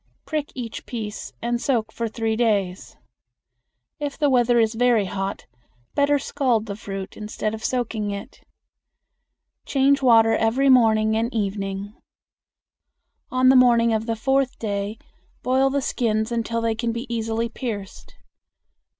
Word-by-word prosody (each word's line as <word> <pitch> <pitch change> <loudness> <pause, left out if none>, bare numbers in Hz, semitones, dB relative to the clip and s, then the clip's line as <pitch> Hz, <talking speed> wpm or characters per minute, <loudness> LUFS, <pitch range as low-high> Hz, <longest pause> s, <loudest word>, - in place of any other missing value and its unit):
Prick 305 -2 -3
each 235 -3 -6
piece 220 -3 -5
and 240 0 -1
soak 225 -5 0
for 230 - -3
three 225 0 -2
days. 205 -6 -1 1.0
If 290 -1 -4
the 290 -3 +2
weather 240 -1 +4
is 225 0 +2
very 235 -2 +3
hot, 195 +1 -4 0.5
better 285 0 +3
scald 250 -5 0
the 200 -2 -5
fruit 195 -3 -7
instead 215 0 -4
of 220 0 -7
soaking 230 -4 -1
it. 200 0 -7 1.3
Change 275 0 +3
water 225 -3 +5
every 250 +5 +2
morning 220 -4 +4
and 230 +2 0
evening. 200 -2 -3 1.4
On 255 0 +3
the 265 - +6
morning 235 -2 +5
of 220 +1 -1
the 230 - 0
fourth 270 +3 0
day 205 0 -3 0.5
boil 265 +1 +3
the 280 0 -1
skins 220 -2 0
until 230 0 -1
they 230 -1 +1
can 230 +1 -2
be 235 +2 -4
easily 225 0 -2
pierced. 225 -5 -7
230 Hz, 140 wpm, -23 LUFS, 215-250 Hz, 1.4 s, the